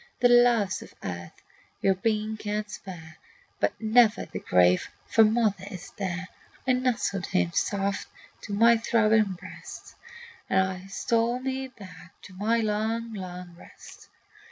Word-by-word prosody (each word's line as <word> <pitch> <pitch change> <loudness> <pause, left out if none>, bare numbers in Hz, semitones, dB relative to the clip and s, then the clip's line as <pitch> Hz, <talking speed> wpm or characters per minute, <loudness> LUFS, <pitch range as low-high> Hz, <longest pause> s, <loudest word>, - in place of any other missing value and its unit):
"The 245 - +5
loves 240 -5 +4
of - - -13
earth 85 -1 -7 0.4
your 195 - +3
being 215 +2 -1
can 210 0 -3
spare, 165 -6 -10 0.4
But - - 0
never 220 0 +4
the - - -6
grave, 90 0 +3 0.2
for 225 - +5
mother 215 -3 +2
is 185 -4 -9
there." 185 -2 -4 0.4
I 260 - +3
nestled 245 -7 0
him 90 -1 +1
soft 200 0 -1 0.3
to - - -8
my 230 +3 +6
throbbing 220 -3 +3
breast, 185 +1 -11 0.6
And 190 0 0
stole 230 +4 +1
me 265 0 -3
back 185 -6 -14
to 195 - -12
my 220 +5 +1
long, 220 +2 -1
long 180 -3 -7
rest. - - -15
210 Hz, 135 wpm, -27 LUFS, 185-230 Hz, 0.6 s, my